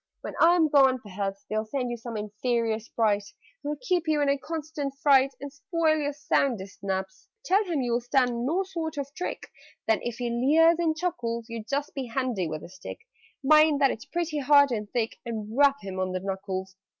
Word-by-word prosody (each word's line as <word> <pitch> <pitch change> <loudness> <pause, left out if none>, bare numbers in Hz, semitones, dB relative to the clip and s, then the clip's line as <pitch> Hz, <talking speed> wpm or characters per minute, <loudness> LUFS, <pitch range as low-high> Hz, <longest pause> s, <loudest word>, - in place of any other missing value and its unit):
When - - -6
I 340 +2 +7
am 325 -3 +4
gone, 270 -3 +5
perhaps 200 -1 -5
They'll 215 0 -1
send 250 0 -2
you - - -2
some 235 -1 -6
inferior 220 +2 -1
Sprite, 215 -2 0 0.3
Who'll 295 +1 -3
keep 360 -8 0
you 305 -1 +2
in 285 -1 +2
a 280 - +2
constant 300 -2 -4
fright 275 -2 +4
And 280 +1 -7
spoil 310 +3 +1
your 290 -2 -1
soundest 240 -9 -1
naps. 190 -1 -4 0.2
"Tell 390 +4 +3
him 325 -7 -1
you'll 240 0 0
stand 245 -1 +1
no 335 +9 +1
sort 325 -4 -5
of 280 0 -4
trick; 360 - -5 0.4
Then, 220 -1 +3
if 240 -1 -4
he 240 -1 -3
leers 315 +8 +4
and 320 -2 +1
chuckles, 235 -9 -2
You 230 -1 -5
just 280 +5 -3
be 270 -3 -4
handy 230 -7 -1
with 155 -1 -5
a - - -10
stick 185 0 -9 0.5
(Mind 305 +1 +5
that 275 -2 +4
it's 225 - -7
pretty 330 -1 -2
hard 285 0 +5
and 210 -3 -3
thick) 230 -1 -2
And 220 -1 -5
rap 280 0 +5
him 190 -1 -5
on 185 0 -1
the 185 - -1
knuckles! 190 0 -4
260 Hz, 200 wpm, -27 LUFS, 220-295 Hz, 0.5 s, I